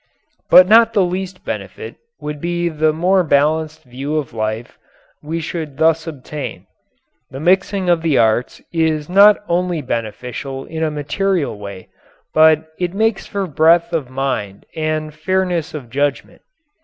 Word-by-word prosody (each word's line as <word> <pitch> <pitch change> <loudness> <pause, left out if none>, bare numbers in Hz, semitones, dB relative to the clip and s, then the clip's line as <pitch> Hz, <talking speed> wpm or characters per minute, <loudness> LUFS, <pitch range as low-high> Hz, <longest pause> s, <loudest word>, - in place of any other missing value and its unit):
But 180 0 +8
not 230 +2 +6
the 200 -3 +3
least 185 +1 -4
benefit - - -6 0.2
would 150 -1 -6
be 175 0 -1
the 155 -1 +1
more 180 +4 +2
balanced 155 +1 +1
view 135 +4 -5
of 145 -7 -4
life 110 +1 -4 0.4
we 160 +3 -4
should 155 -3 -5
thus 160 +1 +2
obtain. 150 -1 -7 0.6
The 130 - -8
mixing 190 +3 +1
of 170 -2 +3
the 160 -4 +1
arts 110 +2 +1
is 160 -2 0
not 200 +3 +7
only 175 -1 0
beneficial 125 +3 -5
in 160 0 -6
a 160 - +1
material 150 - -1
way, 100 -2 -9 0.4
but 155 0 +5
it 180 0 -2
makes 220 -1 0
for 200 -1 -2
breadth 170 +2 +3
of 150 -7 -2
mind 130 -7 -3
and 155 -1 -2
fairness 180 -2 -1
of 125 -6 -8
judgment. 140 +1 -2
155 Hz, 145 wpm, -18 LUFS, 140-175 Hz, 0.6 s, But